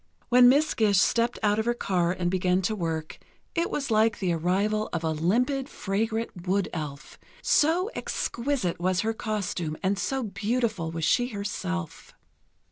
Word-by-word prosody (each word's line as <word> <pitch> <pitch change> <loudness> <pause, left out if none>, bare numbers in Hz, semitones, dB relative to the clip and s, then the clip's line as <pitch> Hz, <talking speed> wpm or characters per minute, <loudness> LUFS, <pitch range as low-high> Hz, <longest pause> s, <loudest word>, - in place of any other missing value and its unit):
When 245 0 +7
Miss 290 +4 +3
Gish 205 -4 +3
stepped 235 +4 +2
out 210 0 +3
of 220 - 0
her 240 0 +1
car 180 -6 0
and 175 -1 -1
began 185 0 +1
to 215 +4 0
work, 160 -4 -4 0.3
it 335 0 0
was 275 -4 -3
like 220 0 +3
the 180 -3 0
arrival 200 +6 0
of 165 -1 -3
a 160 - 0
limpid, 250 - 0
fragrant 215 -2 -3
wood 195 +1 +1
elf, 150 -4 -6 0.2
so 350 +8 +3
exquisite 235 -9 -2
was 185 +1 +1
her 225 +1 0
costume 195 -8 -3
and 195 +1 +1
so 265 +5 -1
beautiful 210 -3 -1
was 165 -1 -2
she 245 +9 +3
herself.... 200 - -5
200 Hz, 160 wpm, -27 LUFS, 175-235 Hz, 0.3 s, When